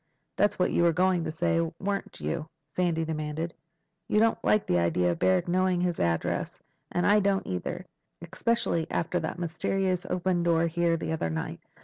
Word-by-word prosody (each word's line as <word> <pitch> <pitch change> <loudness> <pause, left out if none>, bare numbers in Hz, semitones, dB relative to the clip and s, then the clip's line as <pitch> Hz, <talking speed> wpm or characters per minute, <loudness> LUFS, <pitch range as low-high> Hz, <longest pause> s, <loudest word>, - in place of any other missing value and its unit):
That's 205 - +2
what 180 - +2
you - - +2
were 170 -1 +4
going 180 0 +2
to - - -2
say. 165 +1 +1 0.2
Weren't 200 0 -3
you?" 165 -2 -3 0.3
Sandy 170 -3 +1
demanded. 155 +1 -3 0.5
"You 210 - +2
don't 225 +1 +2
like 215 - +3
the 90 - +2
idea 85 +1 +2
of 85 - -4
Barrack 95 -1 +2
knowing 185 0 +2
his 175 -1 0
address, 85 -1 -1 0.3
and 175 - 0
I 210 +1 +5
don't 200 -1 +1
either. 90 -1 -4 0.3
Especially 180 -1 -1
after 175 +2 -1
that 160 +2 -4
mysterious 180 +2 -1
open 180 -1 0
door 170 -1 +3
here 170 0 +1
the 160 - -4
other 160 - -1
night. 80 0 -4
170 Hz, 175 wpm, -28 LUFS, 160-185 Hz, 0.5 s, I